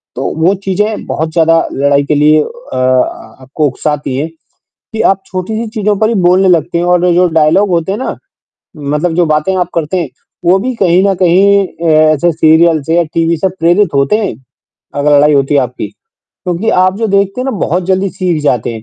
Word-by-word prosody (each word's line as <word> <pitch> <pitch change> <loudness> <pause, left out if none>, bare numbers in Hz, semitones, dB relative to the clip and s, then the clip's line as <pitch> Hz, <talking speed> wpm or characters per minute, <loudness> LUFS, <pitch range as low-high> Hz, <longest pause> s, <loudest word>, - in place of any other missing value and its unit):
तो 130 - -4 0.2
वो 185 +3 +4
चीज़ें 210 +3 -2
बहुत 160 +1 -3
ज़्यादा 165 -1 +3 0.2
लड़ाई 140 +1 +1
के 150 - 0
लिए 150 +1 +4
अ - - -8 0.3
अ, - - -3 0.6
आपको 145 +3 -2
उकसाती 145 0 -3
हैं 150 +3 -2
कि 165 +1 -31 0.5
आप 195 0 -1
छोटी-सी 215 +5 -4
चीज़ों 210 -1 0
पर 220 - +2
ही 235 - -1
बोलने 185 +1 +3
लगते 170 0 +1
हैं 175 - -1
और 180 0 +2
जो 180 +1 +3
डायलॉग 160 +5 +2
होते 170 +2 0
हैं 210 - -4
ना, 260 - -4 0.6
मतलब 150 +4 -2
जो 175 0 +2
बातें 155 +5 0
आप 180 -1 -1
करते 165 +2 -2
हैं, 160 - -4 0.4
वो 180 +3 +3
भी 250 +5 -3
कहीं 185 -2 +2
न 195 - +1
कहीं 195 +3 +3
अ, 170 -1 -5 0.3
ऐसे 170 +3 0
सीरियल 160 0 +3
से 165 +3 -1
या 175 - +3
टीवी 165 0 +1
से 190 +4 0
प्रेरित 175 +1 +2
होते 140 +8 +2
हैं, 210 - -2 0.6
अगर 145 +1 +2
लड़ाई 150 +1 +4
होती 140 +1 +1
है 140 - +4
आपकी, 125 -1 -4 0.4
क्योंकि 180 +3 -5 0.2
आप 185 +1 0
जो 225 - 0
देखते 200 +3 0
हैं - - -3
ना - - 0
बहुत 180 +1 -1
जल्दी 190 +1 0
सीख 175 -5 -2
जाते 125 -6 0
हैं, 110 -1 -8
170 Hz, 205 wpm, -12 LUFS, 150-190 Hz, 0.6 s, वो